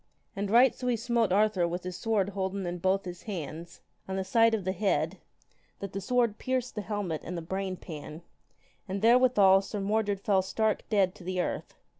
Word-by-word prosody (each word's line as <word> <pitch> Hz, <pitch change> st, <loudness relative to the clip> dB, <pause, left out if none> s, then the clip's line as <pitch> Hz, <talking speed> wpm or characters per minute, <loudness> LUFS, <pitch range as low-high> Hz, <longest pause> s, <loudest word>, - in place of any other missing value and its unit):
And 200 Hz, 0 st, -2 dB
right 245 Hz, +4 st, +6 dB
so 250 Hz, -, -5 dB
he 245 Hz, -, +2 dB
smote 230 Hz, -2 st, 0 dB
Arthur 200 Hz, -3 st, +3 dB
with 175 Hz, +1 st, -4 dB
his 180 Hz, 0 st, -5 dB
sword 210 Hz, -3 st, 0 dB
holden 195 Hz, -1 st, -3 dB
in 175 Hz, 0 st, -4 dB
both 190 Hz, +2 st, +1 dB
his 180 Hz, -1 st, -7 dB
hands, 170 Hz, -4 st, -7 dB, 0.3 s
on 190 Hz, -, -3 dB
the 190 Hz, -, -1 dB
side 225 Hz, +4 st, +4 dB
of 210 Hz, -, -4 dB
the 190 Hz, -, +1 dB
head, 195 Hz, +1 st, 0 dB, 0.6 s
that 200 Hz, -2 st, -7 dB
the 195 Hz, -, -3 dB
sword 235 Hz, -1 st, +1 dB
pierced 255 Hz, -1 st, -2 dB
the 210 Hz, -, -3 dB
helmet 205 Hz, -6 st, -3 dB
and 180 Hz, +1 st, -5 dB
the -, -, -4 dB
brain 190 Hz, +2 st, -3 dB
pan, 155 Hz, 0 st, -9 dB, 0.6 s
and 195 Hz, +2 st, -4 dB
therewithal 230 Hz, -5 st, +6 dB
Sir 205 Hz, +1 st, -5 dB
Mordred 205 Hz, 0 st, 0 dB
fell 195 Hz, -1 st, +2 dB
stark 215 Hz, +3 st, -1 dB
dead 195 Hz, -4 st, +2 dB
to 195 Hz, -, -14 dB
the 185 Hz, +1 st, -3 dB
earth. -, -, -3 dB
195 Hz, 200 wpm, -29 LUFS, 185-220 Hz, 0.6 s, right